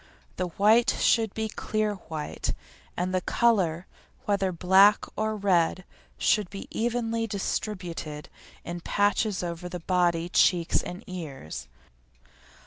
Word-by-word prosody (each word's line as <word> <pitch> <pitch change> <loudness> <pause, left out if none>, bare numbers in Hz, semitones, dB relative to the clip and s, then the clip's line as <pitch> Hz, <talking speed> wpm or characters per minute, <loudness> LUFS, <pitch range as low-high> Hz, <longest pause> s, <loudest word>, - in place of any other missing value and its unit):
The 185 - -1
white 215 +7 +4
should 225 -3 +3
be 220 0 -1
clear 215 0 -1
white, 160 -6 -4 0.4
and 180 +1 -1
the 185 - +1
colour, 185 -7 +2 0.4
whether 195 -2 +1
black 190 +4 +5
or 215 0 -1
red, 185 -3 +2 0.3
should 210 -4 +2
be 195 - -7
evenly 230 -1 -1
distributed 185 -7 -4 0.4
in 175 +1 -5
patches 205 +1 +1
over 175 +1 -5
the 180 0 -5
body, 175 -1 +1
cheeks, 175 -1 +3
and 180 - -7
ears. 135 - -7
185 Hz, 120 wpm, -27 LUFS, 175-215 Hz, 0.4 s, black